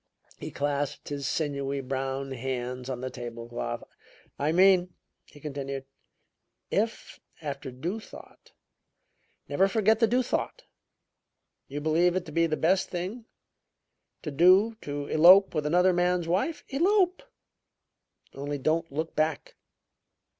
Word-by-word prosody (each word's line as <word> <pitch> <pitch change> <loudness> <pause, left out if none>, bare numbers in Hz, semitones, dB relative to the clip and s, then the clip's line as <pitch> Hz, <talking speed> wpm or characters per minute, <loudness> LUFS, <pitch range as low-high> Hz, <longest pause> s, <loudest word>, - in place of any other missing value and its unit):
He - - -6
clasped 145 0 -2
his 140 -2 -3
sinewy, 140 -3 -2
brown 135 +1 -3
hands 125 0 -4
on 125 -2 -4
the 130 0 -4
table 120 -1 -7
cloth. 120 0 -4 0.6
"I 145 +2 +1
mean," 180 0 +4 0.3
he 145 - -17
continued, 140 -2 -5 0.9
"if, 220 +3 -2 0.2
after 140 -3 -5
due 165 - -4
thought - - -14 1.0
never 195 - +3
forget 215 +2 +2
the 230 - +4
due 250 +3 +2
thought - - -3 1.0
you 145 +2 -5
believe 165 +3 +2
it 185 -1 -1
to 155 - -9
be 165 +2 +2
the 155 -1 -1
best 185 +4 +2
thing 190 +7 -5 1.0
to 150 - -4
do 185 +9 +5
to 145 0 -4
elope 180 +7 +7
with 150 -2 -1
another 180 +4 +4
man's 175 -1 +1
wife, 200 - -1
elope; 365 +5 +2 1.1
only 145 +1 -4
don't 160 +4 0
look 160 +3 -4
back. 155 0 -1
155 Hz, 130 wpm, -28 LUFS, 140-185 Hz, 1.1 s, elope